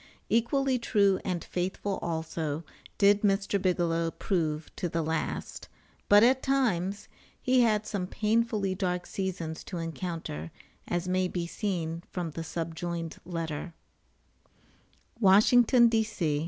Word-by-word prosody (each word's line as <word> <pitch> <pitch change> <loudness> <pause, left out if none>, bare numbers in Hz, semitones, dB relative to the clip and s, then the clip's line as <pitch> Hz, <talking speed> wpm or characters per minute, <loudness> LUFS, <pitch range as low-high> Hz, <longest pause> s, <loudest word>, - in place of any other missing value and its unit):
Equally 255 +3 +2
true 200 -5 +3
and 180 -3 -2
faithful 190 +2 -3
also 160 -2 -3 0.3
did 205 0 +5
Mr. 195 -1 +1
Bigelow 170 -3 +1
prove 160 -4 -2
to 175 - -2
the 165 0 -1
last; 160 0 -3 0.4
but 205 +1 +8
at 260 +2 +4
times 210 -7 0 0.3
he 255 0 +3
had 215 -3 +2
some 195 -4 -3
painfully 215 -2 0
dark 180 -2 -2
seasons 175 -5 -4
to 180 - -5
encounter, 165 - -5 0.4
as 175 +1 -1
may 185 0 +1
be 175 -1 -3
seen 170 -3 -3
from 175 -3 -4
the 165 +2 -5
subjoined 165 0 -4
letter: 165 -1 -4 1.4
WASHINGTON, 235 +4 +6
D.C. 215 -10 0
185 Hz, 120 wpm, -29 LUFS, 165-210 Hz, 1.4 s, but